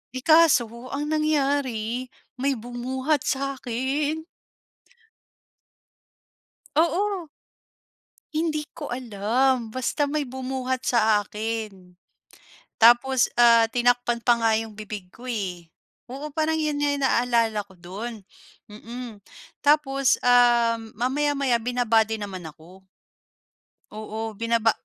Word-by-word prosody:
Eh, 255 - -4
kaso 315 -6 +6 0.3
ang 295 +2 -3
nangyari, 275 -6 0 0.3
may 275 +1 +1
bumuhat 255 +5 -2
sa 275 0 -1
akin. 285 +6 -2 2.5
Oo. 350 +2 +1 1.1
Hindi 310 -1 0 0.2
ko - - -5
alam 240 +1 0
basta 260 +3 0
may 295 +1 -1
bumuhat 260 -1 -4
sa 215 -3 +3
akin. 210 -4 -6 0.8
Tapos 240 +3 +5
ah 230 -1 +6
tinakpan 245 0 +1
pa 235 -1 +3
nga 225 -1 +3
yung 225 0 -4
bibig 210 -3 -8
ko 250 +2 -11
eh. 185 -8 -4 0.4
Oo 280 +4 -7
parang 315 +1 0
'yon 300 -2 -1
nga 285 -1 +1
naalala 235 -5 +1
ko 190 - -18
do'n, 200 +5 -8 0.5
mm. 230 0 -9 0.4
Tapos 275 -3 +3
um, 235 -2 +4
mamaya-maya 270 0 +1
binaba 240 -1 +2
din 220 -2 -3
naman 190 -2 -7
ako. 170 +5 -16 1.1
Oo, 220 +1 -6
binaba 230 -1 +2
245 Hz, 105 wpm, -24 LUFS, 225-275 Hz, 2.5 s, kaso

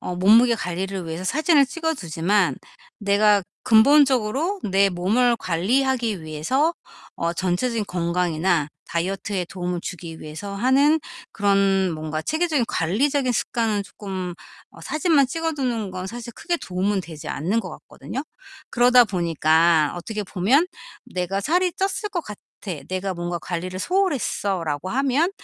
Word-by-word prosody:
어 180 - -4
몸무게 225 +6 +5
관리를 185 -2 -4
위해서 165 +3 -5
사진을 300 - +3
찍어 320 +2 -2
두지만 180 - 0 0.4
내가 205 0 +3 0.2
근본적으로 275 - +4
내 195 0 +3
몸을 220 +8 +2
관리하기 225 +3 0
위해서 160 - 0 0.4
어 170 0 -1
전체적인 205 +6 -1
건강이나 170 -2 0 0.2
다이어트에 185 +2 -2
도움을 180 -1 -4
주기 165 -2 -7
위해서 160 +7 -7
하는 275 +8 +3 0.3
그런 195 -2 +2
뭔가 155 0 -4
체계적인 315 - 0
관리적인 255 - +1
습관은 220 -2 0
쪼끔 190 -3 -6 0.4
어 - - -15
사진만 305 -3 +2
찍어두는 265 - -2
건 185 0 -5
사실 235 +2 -7
크게 345 +7 -2
도움은 190 0 -1
되지 160 -3 -10
않는 185 +10 -1
것 195 -5 -3
같거든요? 155 - -7 0.5
그러다 245 +1 +6
보니까 165 -4 +2
어떻게 210 +4 -4
보면 215 - +2 0.4
'내가 185 +2 -2
살이 355 - +1
쪘을 390 +3 -2
것 350 - 0
같아. 210 -8 -10 0.5
내가 185 +1 -2
뭔가 175 0 -3
관리를 180 +2 -5
소홀 370 - +1
했어.'라고 185 - -2
하면 275 +6 +1
200 Hz, 320 characters per minute, -23 LUFS, 175-260 Hz, 0.5 s, 그러다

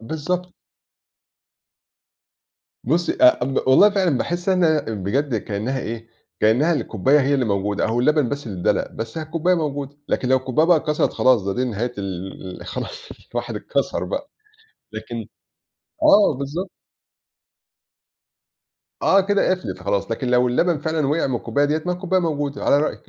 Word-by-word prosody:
بالضبط. 175 +8 -3 2.3
بُصّي، 165 +7 +1
آآ 315 +1 +6
ب 135 - -3
والله، 200 +11 +7
فعلًا 185 -9 +1
باحس 175 +2 -3
إنها 170 -5 +3
بجد 115 +4 -2
كإنها 110 +6 -3
إيه، 115 0 -6 0.3
كإنها 125 +11 +3
الكوباية 135 - +2
هي 140 +2 +1
اللي 130 - +1
موجودة، 100 -1 0
أو 115 +2 0
اللبن 150 -1 +2
بس 145 -3 -5
اللي 95 -5 -6
إدّلق، - - 0
بس 115 +5 -6
أهي 160 - -3
الكوباية 170 +3 +1
موجودة، 145 -3 -3
لكن 125 - -1
لو 130 - +5
الكوباية 130 +5 +1
بقى 170 -4 +5
كسرت، 150 -1 0
خلاص، 125 -6 +3
ده 100 0 -2
دي 125 - 0
نهاية 120 +1 -3
ال 95 -1 -6
ال - - -13
خلاص، - - -5 0.3
الواحد 120 -2 -3
اتكسر 140 +5 -2
بقى، 285 +1 -5 0.6
لكن - - -6 0.8
آه، 210 - +6
بالضبط. 155 +8 -4 2.3
آه، 195 - +5
كده 200 0 +1
قَفلت 185 - -2
خلاص، 100 +2 -1
لكن 125 +2 -2
لو 125 0 +3
اللبن 165 +6 +1
فعلًا 155 -1 -1
وقع 150 +2 +1
من 130 -2 -1
الكوباية 145 +4 0
ديّة، 155 +2 0
ما 180 - +1
هي - - -2
الكوباية 185 0 0
موجودة، 145 -4 -2
على 140 - +4
رأيِِك، 155 - -3
140 Hz, 160 wpm, -21 LUFS, 115-165 Hz, 2.3 s, والله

